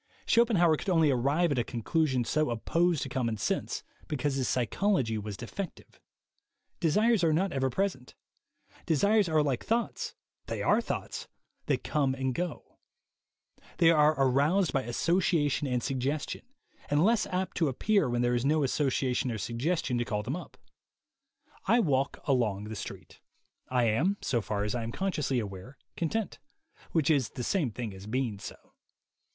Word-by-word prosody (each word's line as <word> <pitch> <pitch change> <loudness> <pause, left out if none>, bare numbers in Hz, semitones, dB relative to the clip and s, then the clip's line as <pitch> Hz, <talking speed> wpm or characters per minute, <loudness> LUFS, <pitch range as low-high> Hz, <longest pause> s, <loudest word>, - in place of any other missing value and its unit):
Schopenhauer 195 -9 +4
could - - -4
only 165 -5 +4
arrive 140 +7 +2
at 135 - +1
a - - +2
conclusion 130 +2 0
so 155 +3 +1
opposed 165 +8 +1
to - - -4
common 115 -4 -1
sense - - -2 0.2
because 145 -1 -1
his 135 -2 -1
psychology 130 - +1
was 105 -1 -5
defective. 175 - -7 0.8
Desires 210 +5 +3
are 165 - +4
not 180 +5 +1
ever 135 -1 +1
present. 130 -3 -2 0.7
Desires 200 +5 +3
are 155 -1 +3
like 135 -4 -1
thoughts 235 +1 -1 0.2
— - - -57
they - - -3
are - - +3
thoughts - - -4 0.2
— - - -49
that - - 0
come 140 -4 +1
and 130 -1 -1
go. 175 +2 -5 1.0
They 165 -1 +6
are 155 -1 +4
aroused 145 +8 +3
by 135 - +2
association 150 +2 +1
and 125 -2 -1
suggestion, 135 - -2 0.4
and 145 +4 +3
less 230 0 +3
apt 185 +1 -2
to 165 - +2
appear 200 - +1
when 120 0 0
there 120 0 +2
is 120 0 0
no 150 +2 +2
association 130 -2 0
or 115 - -2
suggestion 125 - -1
to - - +1
call 105 -2 -2
them 130 +7 -3
up. 180 - -9 1.1
I 235 - +5
walk 140 - +1
along 115 -8 +1
the 110 +1 -6
street. 100 - -8 0.5
I 125 -1 +2
am, 140 - +2
so 120 -3 0
far 105 -1 -2
as 105 - -2
I 120 - -2
am 115 0 -4
consciously 150 -6 -1
aware, 105 +4 -6 0.2
content; 200 +6 -2 0.5
which 160 -2 +2
is 135 -6 +2
the 125 - -6
same 165 -2 +1
thing 110 -1 -5
as 95 +1 -10
being 115 -3 -1
so. - - -8
140 Hz, 165 wpm, -29 LUFS, 120-170 Hz, 1.1 s, They